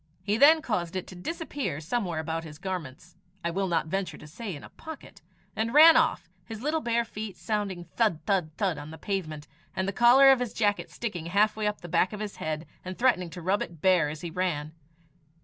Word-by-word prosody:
He 205 0 +1
then 305 +6 +6
caused 180 - -2
it 185 - -3
to 185 - -10
disappear 280 - -4
somewhere 175 0 -2
about 160 +1 -3
his 155 -2 -10
garments 175 -3 -6 0.3
I 170 - 0
will 195 +2 -1
not 170 -3 +1
venture 190 +3 -3
to - - -13
say 185 +5 -6
in 140 - -10
a - - -11
pocket 320 -2 -11 0.3
and 230 +4 -1
ran 320 +2 +10
off, 320 - +2 0.2
his 220 +4 -8
little 310 +2 0
bare 235 -2 +1
feet 215 -3 -7
sounding 205 -5 -2
thud, 215 -9 +2
thud, 185 -4 +1
thud 185 -7 0
on 145 +1 -8
the 160 - -9
pavement, 155 -5 -4 0.3
and 190 0 -1
the 195 - -1
collar 250 +5 +7
of 265 - +4
his 245 -3 -3
jacket 205 -2 0
sticking 180 -8 -5
halfway 210 +3 +2
up 210 - -3
the 175 - -8
back 175 +4 +2
of 210 - -6
his 210 -1 -5
head, 155 +1 -3 0.2
and 185 0 -6
threatening 235 -9 +2
to 170 +1 -9
rub 190 +4 +1
it 170 -2 -6
bare 180 -3 +3
as 150 0 -7
he 170 - -5
ran. 160 -4 -2
190 Hz, 220 wpm, -28 LUFS, 165-225 Hz, 0.3 s, ran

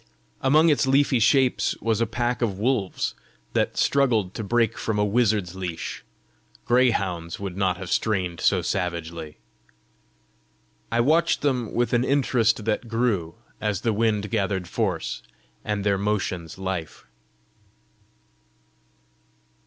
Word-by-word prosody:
Among 155 +5 +5
its 145 -3 +2
leafy 135 -1 +3
shapes 130 +3 +3
was 115 -1 0
a 115 - +2
pack 120 +2 -1
of 105 -6 0
wolves 110 -3 0 0.4
that - - 0
struggled 115 -9 +2
to 110 - -5
break 115 +1 +1
from 110 -2 -2
a 105 - +2
wizard's 105 -4 +1
leash: 90 -3 -5 0.6
greyhounds 100 -9 +1
would 100 -3 -5
not 95 -2 +1
have 90 -1 -7
strained 90 -6 0
so 90 -3 +2
savagely! 85 -4 -3 1.5
I 115 +1 +3
watched 155 +7 +2
them 125 -6 0
with 120 +1 +1
an 120 0 +3
interest 120 -5 +2
that 110 +2 -1
grew 110 -8 0 0.3
as 105 -2 -1
the 115 -2 +1
wind 105 -1 0
gathered 95 -2 -1
force, 95 -4 -2 0.4
and 105 -1 -2
their 100 -1 +1
motions 95 -5 -2
life. 95 -4 -5
105 Hz, 125 wpm, -24 LUFS, 95-120 Hz, 1.5 s, Among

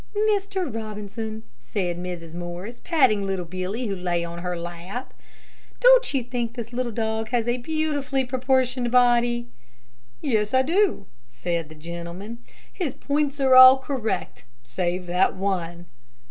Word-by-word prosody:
"Mr. 390 -2 -2
Robinson," 220 0 -5 0.2
said 175 - -2
Mrs. 175 -2 -6
Morris, 175 +6 -6
patting 260 - +3
little 190 -2 -2
Billy, 185 +7 -4
who 200 -3 -2
lay 175 -2 -1
on 170 0 -7
her 180 0 -3
lap, 175 +8 -7 0.7
"don't - - +6
you 270 -3 0
think 240 -1 -3
that - - -22
this 235 0 -6
little 245 -1 -2
dog 220 0 -2
has 240 -1 0
a 240 +1 +1
beautifully 285 -1 -1
proportioned 255 -1 +1
body?" 240 -1 +3 0.7
"Yes, 220 -3 0
I 260 - +5
do," 355 - +1 0.2
said 165 +6 -3
the 155 - -12
gentleman. 170 +7 -7 0.3
"His 335 -9 -3
points 290 0 -1
are 265 -1 +4
all 255 +1 +10
correct, 230 - -3 0.2
save 175 +9 -2
that 180 +2 +2
one." 175 -3 -2
220 Hz, 145 wpm, -24 LUFS, 180-255 Hz, 0.7 s, all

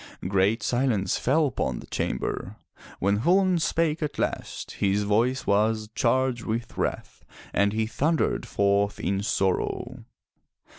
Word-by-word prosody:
Great 100 +4 +2
silence 120 -7 +1
fell 155 +5 +2
upon 135 - -2
the - - -9
chamber. - - -3 0.4
When 100 +2 +1
Chulain 185 +3 +3
spake 165 0 0
at 150 - -3
last - - -3
his 100 +1 0
voice 115 +6 +1
was 110 +1 +1
charged 125 0 +1
with 115 +1 -3
wrath - - -3 0.3
and 100 0 +3
he 110 +1 0
thundered 150 +8 0
forth 100 0 +1
in 95 +2 -1
sorrow. 100 -5 -1
110 Hz, 130 wpm, -26 LUFS, 100-130 Hz, 0.4 s, Chulain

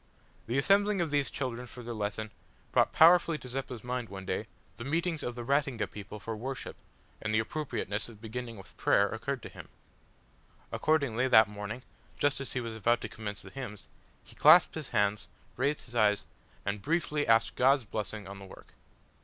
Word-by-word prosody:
The 120 +4 0
assembling 200 +7 +4
of 165 -4 0
these 145 -2 +2
children 125 -2 -4
for 125 0 -10
their 120 0 -5
lesson 110 0 -3 0.4
brought - - +3
powerfully 165 0 +6
to 130 - -10
Zeppa's 125 -2 -5
mind, 125 -1 -3
one 95 -1 -7
day, - - -2 0.3
the 115 - -6
meetings 165 +4 0
of 120 - -4
the 120 - -5
Ratinga 140 -2 +1
people 105 +1 -8
for 110 +2 -5
worship, 130 +5 -5 0.5
and 110 - -2
the 110 - +3
appropriateness 110 -4 -2
of 110 -3 -13
beginning 115 +1 -6
with 95 - -13
prayer 100 - +4
occurred 120 +4 -3
to - - -7
him. - - -11 1.0
Accordingly, 140 -6 +1
that 110 -4 +7
morning, 105 +4 -6 0.3
just 145 -1 +1
as 135 - -5
he 130 - 0
was 115 -2 -4
about 120 +2 +2
to - - -5
commence 105 -2 -6
the - - -11
hymns, 115 -7 -7 0.4
he - - -15
clasped - - +7
his - - -6
hands, 105 0 +1 0.3
raised 140 +4 0
his 120 - -14
eyes, 105 -3 +3 0.4
and 100 +1 -2
briefly 155 - 0
asked 115 0 +4
God's 135 0 +4
blessing 105 -1 -4
on 100 0 -8
the 100 - -10
work. 95 - -14
120 Hz, 185 wpm, -30 LUFS, 105-140 Hz, 1.0 s, that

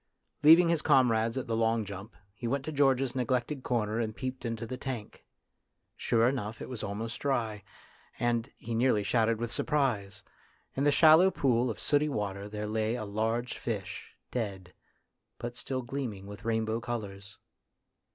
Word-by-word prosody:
Leaving 165 +3 +8
his 165 -2 +2
comrades 115 -2 +3
at 130 - -2
the 115 -2 -1
long 115 -1 +1
lump, 100 +3 -8 0.2
he 115 +3 -5
went 135 +3 -1
to 155 - -3
George's 135 -3 +2
neglected 130 +2 -1
corner 115 -3 -1
and 110 -2 -2
peeped 130 -1 -5
into 115 -1 -3
the 130 - -5
tank. 125 -4 -6 0.7
Sure 115 0 +2
enough 115 -4 -2
it - - -6
was 125 -4 -6
almost 115 +4 -4
dry, 115 -7 -1 0.6
and, 120 +1 0
he 115 - -6
nearly 115 -2 +2
shouted 115 +2 +2
with 120 0 -3
surprise, 120 -9 -1 0.5
in 140 - 0
the 145 - +5
shallow 160 +5 +7
pool 125 -7 +1
of 110 - -4
sooty 150 +1 +2
water 100 -5 -3
there 105 0 -4
lay 110 +2 0
a 110 - -4
large 115 +4 -2
fish, 105 -5 -5 0.2
dead, 95 -6 -4 0.6
but 120 0 -5
still 130 +1 -3
gleaming 120 -6 -4
with 105 +3 -10
rainbow 110 0 0
colours. 100 -5 -6
115 Hz, 160 wpm, -30 LUFS, 110-130 Hz, 0.7 s, Leaving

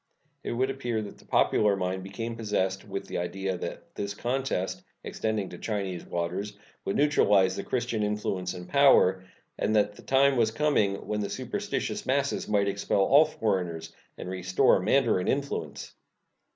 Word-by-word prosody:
It - - -3
would 130 +3 +1
appear 120 -4 -2
that 100 - -10
the - - -19
popular 105 -2 +3
mind 95 0 -2
became 115 +5 -5
possessed 100 -3 -1
with 100 0 -4
the - - -4
idea 95 +2 -2
that 90 - -7
this 100 0 -4
contest, 125 -5 -2 0.2
extending 110 -3 -2
to 90 - -10
Chinese 100 -5 -3
waters, 95 +4 -3 0.3
would 95 - -1
neutralize 100 -10 +4
the 100 - -4
Christian 120 -3 -1
influence 100 -3 -2
and 90 0 -8
power, 115 -10 +5 0.4
and 110 - +1
that 105 -1 +3
the - - -14
time 135 0 +3
was 115 -2 +3
coming 110 -6 +1
when 105 - -1
the 100 - -2
superstitious 205 - -3
masses 140 +1 0
might 100 -1 +2
expel 100 0 0
all 140 +10 +6
foreigners 90 - -2 0.2
and - - -7
restore 90 0 +2
mandarin 110 -2 +2
influence. 140 +1 -3
105 Hz, 160 wpm, -28 LUFS, 95-125 Hz, 0.4 s, all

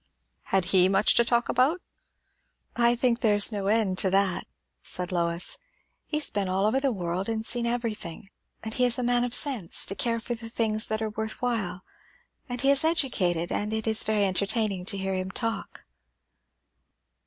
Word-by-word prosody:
"Had 190 -2 +1
he 185 -1 +5
much 195 +2 +4
to 235 - +4
talk 235 +1 +1
about?" 275 +8 +2 1.0
"I 240 0 +3
think 240 -1 +1
there 215 -4 +3
is 205 +2 +4
no 200 -2 -3
end 205 -3 +2
to 190 - +3
that," 195 -1 +1 0.3
said 180 0 -3
Lois. 170 - -2 0.5
"He 300 - -2
has 300 - -1
been 200 -3 -1
all 190 +2 +1
over 230 +5 +2
the 270 -1 0
world 185 -1 -3
and 220 0 -2
seen 235 0 -1
everything; 215 -7 -4 0.4
and 220 0 -4
he 250 - +2
is 240 -1 +2
a 250 - -2
man 245 0 +2
of 245 0 +1
sense, 250 - 0
to - - +1
care 230 +3 -1
for 240 - -4
the 230 -1 -8
things 220 -2 0
that 220 0 -2
are 215 - -3
worth 220 +1 -4
while; 215 -7 -2 0.7
and 245 0 -3
he 275 - +4
is 280 +1 +3
educated; 195 - +1
and 210 +1 -2
it 220 0 -2
is 220 -1 +2
very 210 -2 +1
entertaining 195 0 +1
to 200 - +3
hear 195 0 -2
him 185 0 -3
talk." 225 +3 -3
220 Hz, 190 wpm, -26 LUFS, 195-240 Hz, 1.0 s, he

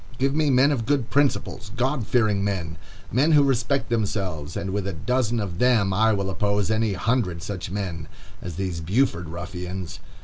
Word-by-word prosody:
Give 135 +2 +1
me 155 -1 +2
men 135 +2 +5
of 115 -6 -1
good 140 -5 0
principles,—God 130 -2 0
fearing 105 -5 +2
men,—men 100 - -1
who 145 -1 +6
respect 135 +1 +1
themselves, 95 -9 -2
and 95 - -3
with 100 0 -2
a 100 - -2
dozen 120 +6 0
of 95 -4 -4
them 115 -6 +3
I 110 +3 +4
will 100 -2 -1
oppose 100 +2 0
any 110 -1 +1
hundred 95 -5 0
such 95 -3 -5
men 90 -5 -4 0.3
as 90 -2 -6
these 90 -2 -3
Buford 90 - 0
ruffians. 90 +1 -6
105 Hz, 165 wpm, -24 LUFS, 90-125 Hz, 0.3 s, who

